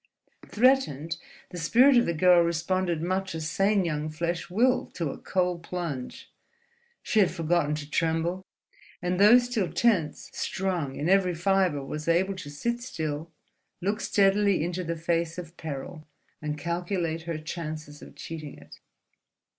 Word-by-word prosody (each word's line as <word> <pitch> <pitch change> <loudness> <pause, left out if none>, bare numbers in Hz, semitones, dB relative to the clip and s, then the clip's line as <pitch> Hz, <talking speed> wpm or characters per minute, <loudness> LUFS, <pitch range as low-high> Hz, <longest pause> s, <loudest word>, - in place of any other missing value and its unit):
Threatened, 205 - +2 0.3
the 175 - -6
spirit 250 +11 +5
of 240 - +4
the 170 - +1
girl 180 +2 +6
responded 170 0 0
much 190 0 -1
as 160 -1 -3
sane 195 +3 +2
young 155 -1 -2
flesh 170 +2 -3
will 250 +7 +2
to 165 -5 -2
a - - -8
cold 180 -2 -1
plunge. 170 -7 -5 0.7
She 220 - +1
had 195 - +5
forgotten 165 -3 0
to 150 -1 -6
tremble, 165 +4 0 0.6
and 180 +1 -1
though 210 +4 +8
still 245 - -1
tense 175 -4 +1
strung 180 -8 -2
in 150 - -2
every 185 -2 +3
fibre 175 -5 +1
was 150 +3 -6
able 180 +4 +2
to 155 -6 -7
sit 235 +12 -2
still, 160 - -4 0.5
look 205 +4 -1
steadily 200 -3 +3
into 175 +2 -2
the 170 0 -3
face 165 0 -1
of 170 -1 -8
peril, 155 +1 -7 0.3
and 150 -1 -3
calculate 170 0 -2
her 165 - -2
chances 155 -2 -6
of - - -12
cheating 155 -3 -8
it. - - -15
170 Hz, 150 wpm, -27 LUFS, 155-190 Hz, 0.7 s, though